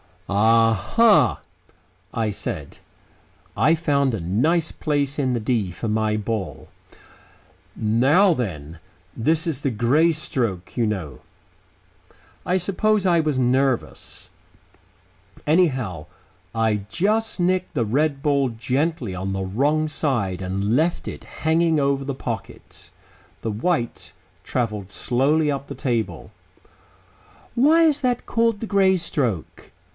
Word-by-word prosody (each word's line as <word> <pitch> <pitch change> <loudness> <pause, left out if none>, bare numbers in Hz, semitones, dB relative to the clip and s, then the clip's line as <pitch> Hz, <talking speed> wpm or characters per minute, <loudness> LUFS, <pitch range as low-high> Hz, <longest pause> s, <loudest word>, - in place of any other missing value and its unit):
"A 115 +3 +4
ha!" 215 - +3 0.7
I 115 -2 0
said. 100 - -5 0.8
I 160 - +4
found 140 -5 +1
a 110 - -2
nice 150 - +1
place 145 -2 -1
in 130 -3 +1
the 120 - -1
"D" 105 -5 0
for 110 +6 -5
my 110 0 +1
ball. 105 -2 -4 1.1
"Now 135 - +3
then. 85 - -5 0.4
This 160 +8 +1
is 160 -6 -2
the 135 - 0
Grey 130 +9 +2
stroke, 120 - -3
you 115 -2 +2
know." 85 -11 -4 1.3
I 180 - +1
suppose 200 +3 +1
I 175 -2 +4
was 155 -4 0
nervous. 130 0 -1 1.2
Anyhow, 130 - +1 0.5
I 110 -3 0
just 215 +4 0
nicked 185 +1 0
the 120 -6 0
red 140 +5 0
ball 140 -3 +2
gently 125 - -2
on 95 +2 -3
the 95 0 -2
wrong 145 +11 0
side 115 - -1
and 100 +4 -1
left 165 +3 0
it - - -9 0.2
hanging 160 0 +3
over 140 -1 0
the 140 -1 -3
pocket. 115 -5 -7 0.5
The 115 - -2
white 120 +3 -2 0.3
travelled 105 -6 -3
slowly 145 +7 +1
up 140 0 -4
the - - -7
table. 120 -4 -3 1.2
"Why 310 +7 +5
is 305 -3 +3
that 250 -2 -1
called 230 -2 +1
the - - -2
Grey 195 -3 +3
stroke?" 125 - -3
135 Hz, 125 wpm, -22 LUFS, 110-165 Hz, 1.3 s, Why